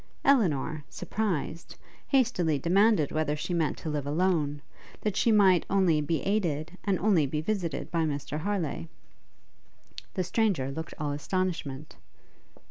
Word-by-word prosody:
Elinor, 160 - +2
surprised, 175 -6 -3 0.3
hastily 220 - +2
demanded 185 - +3
whether 155 -1 0
she 150 +4 -4
meant 165 -3 0
to - - -8
live 145 -2 -2
alone, 150 -3 0 0.4
that 210 -3 -1
she 230 - +3
might 195 -5 +5
only 185 -6 +3
be 155 +2 -1
aided, 175 -5 -1
and 195 -2 +1
only 180 -8 +3
be 150 +3 -2
visited 170 -4 -2
by 165 -1 +1
Mr 150 0 -3
Harleigh. 170 -3 -2 1.3
The 185 - 0
stranger 180 - 0
looked 160 +4 -6
all 150 -1 -2
astonishment. 150 -2 -3
165 Hz, 130 wpm, -28 LUFS, 150-195 Hz, 1.3 s, might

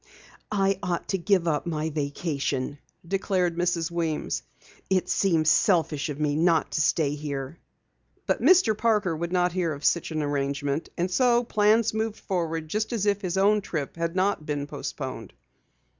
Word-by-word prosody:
"I 195 -2 +1
ought 180 -3 -3
to 195 - 0
give 180 -1 +2
up 155 +1 0
my 160 -1 -2
vacation," 145 -2 -2 0.3
declared 185 -2 0
Mrs. 175 -1 0
Weems. 165 -3 -2 0.5
"It 190 -1 +1
seems 165 -5 +3
selfish 165 -8 +2
of 145 0 -5
me 150 -1 +1
not 165 0 +2
to 155 - 0
stay 150 -1 +2
here." 145 0 -5 0.7
Mr. 365 -12 +4
Parker 210 -6 +1
would 170 +2 -4
not 180 -1 +2
hear 175 -2 -1
of 145 -1 -6
such 170 - +2
an 155 -2 -2
arrangement, 140 +1 -2
and 180 +2 -1
so 240 +2 +3
plans 215 0 +3
moved 220 0 -2
forward 165 -6 -2
just 215 +8 -2
as 215 -4 0
if 205 -1 +1
his 185 -2 -2
own 205 +2 +4
trip 155 -7 -4
had 170 +1 -2
not 190 -3 +1
been 145 -1 -3
postponed. 130 -6 -6
170 Hz, 160 wpm, -26 LUFS, 150-195 Hz, 0.7 s, Mr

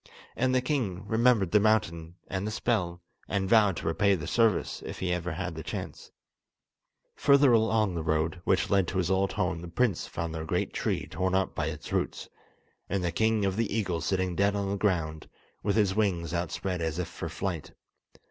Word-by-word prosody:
And 130 +1 +1
the 130 - +2
king 105 -9 -2
remembered 110 -4 +3
the 105 - +6
mountain, 85 -6 +1
and 100 +1 -3
the - - 0
spell, 90 -6 -1 0.3
and 95 -1 0
vowed 105 -4 +4
to - - -6
repay 100 +5 +3
the 80 - -5
service 115 -5 +1
if - - -6
he 90 -1 -1
ever 90 0 -2
had - - -4
a - - -4
chance. - - -6 1.1
Further 140 -1 +5
along 110 -3 +3
the 85 - -2
road 80 +2 0
which 95 - +1
led 95 -3 +3
to 95 - -3
his 90 0 +1
old 95 +1 +1
home 90 -5 -1
the 85 - -7
prince 100 +1 0
found 85 -1 -4
the 80 -1 -4
great 80 - -1
tree - - -1
torn 95 0 -1
up 95 -1 +1
by 80 - -2
its 80 -2 -6
roots, - - -2 0.6
and 100 -2 -1
the 85 - 0
king 110 0 +2
of 95 -1 0
the 115 -2 0
eagles 90 -7 -1
sitting 95 -2 0
dead 100 +2 +2
on 100 -1 -1
the - - 0
ground, 85 -6 -1 0.3
with 100 - 0
his 105 -4 +3
wings 95 -6 0
outspread 90 +1 -2
as 80 -1 -2
if 90 - -2
for - - -6
flight. 90 -6 -4
95 Hz, 200 wpm, -28 LUFS, 85-105 Hz, 1.1 s, the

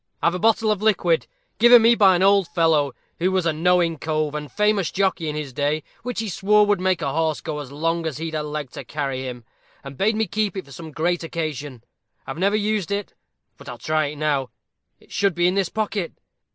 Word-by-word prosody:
I've 170 - +2
a 180 - -3
bottle 225 0 +3
of 210 -2 -1
liquid, 180 -6 +2 0.3
given 240 0 +8
me 230 +1 +6
by 195 -5 +5
an 180 - +1
old 195 -2 +4
fellow, 155 -6 +2 0.3
who 180 +3 +1
was 185 -2 0
a 165 - +2
knowing 170 0 +2
cove 155 -1 -1
and 150 -3 -5
famous 210 -1 +1
jockey 185 -5 0
in 150 - -4
his 150 -4 -5
day, 145 +3 -1 0.2
which 245 -1 -3
he 220 - -4
swore 210 +2 +3
would 205 -2 +1
make 185 -1 +1
a 135 - -1
horse 160 -1 0
go 150 -2 -5
as 140 -3 -8
long 165 +3 -1
as 150 - -4
he'd 160 0 -5
a 155 - -1
leg 150 -3 -5
to - - -8
carry 135 -3 -3
him, 125 -1 -7 0.4
and 135 -1 -9
bade 215 +3 +2
me 220 +1 +1
keep 210 -2 -2
it 190 - -5
for 140 - -16
some 160 +3 -9
great 170 +3 -1
occasion. 150 -6 -5 0.4
I've 135 +5 -6
never 200 +3 +2
used 210 -3 0
it; 200 0 -3 0.4
but - - -11
I'll 120 - -7
try 155 +5 0
it 145 - -6
now. 145 -3 -1 0.5
It - - -23
should 200 -4 +1
be 175 0 +1
in 180 - +2
this 195 -2 0
pocket. 210 -5 -2
165 Hz, 230 wpm, -22 LUFS, 150-200 Hz, 0.5 s, given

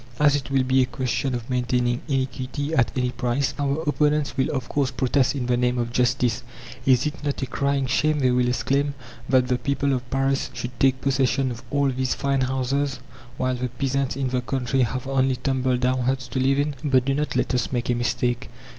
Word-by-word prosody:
As 145 -1 +5
it 140 -1 -3
will 135 -1 +2
be 130 +1 +3
a 130 - +2
question 130 0 -1
of 120 -1 -5
maintaining 125 -1 0
iniquity 135 +2 -2
at 130 -7 +3
any 125 -1 +1
price, 125 +2 -1
our 145 +2 0
opponents 150 0 +1
will 130 -1 +1
of 130 -5 -3
course 140 -3 0
protest 130 +2 +1
"in 130 -3 -2
the 125 0 +2
name 125 0 +1
of 120 -1 -2
justice." 125 -1 +1 0.5
"Is 130 0 +4
it 150 0 -4
not 145 -2 -2
a - - +1
crying 140 +1 0
shame," 150 +4 +1
they 130 -3 +2
will 125 0 +2
exclaim, 140 +3 0 0.3
"that 130 -1 +4
the 125 -1 0
people 140 +1 0
of 125 -1 -3
Paris 135 0 0
should 120 - -4
take 130 -1 +3
possession 135 -1 +1
of 120 -1 -7
all 140 -1 +2
these 130 0 -1
fine 140 -1 0
houses, 130 +1 -1 0.4
while 130 0 0
the 125 0 -2
peasants 135 +1 -1
in 135 -1 -1
the 125 0 0
country 130 +1 -1
have 125 +2 -1
only 135 -1 +1
tumble 130 0 0
down 130 +1 +1
huts 130 +1 -1
to 130 - -2
live 135 +1 +2
in?" 145 +1 0
But 130 -4 +3
do 135 - +1
not 150 +2 -1
let - - 0
us 125 -2 0
make 120 -1 -1
a - - +3
mistake. 120 0 -1
130 Hz, 215 wpm, -24 LUFS, 125-140 Hz, 0.5 s, As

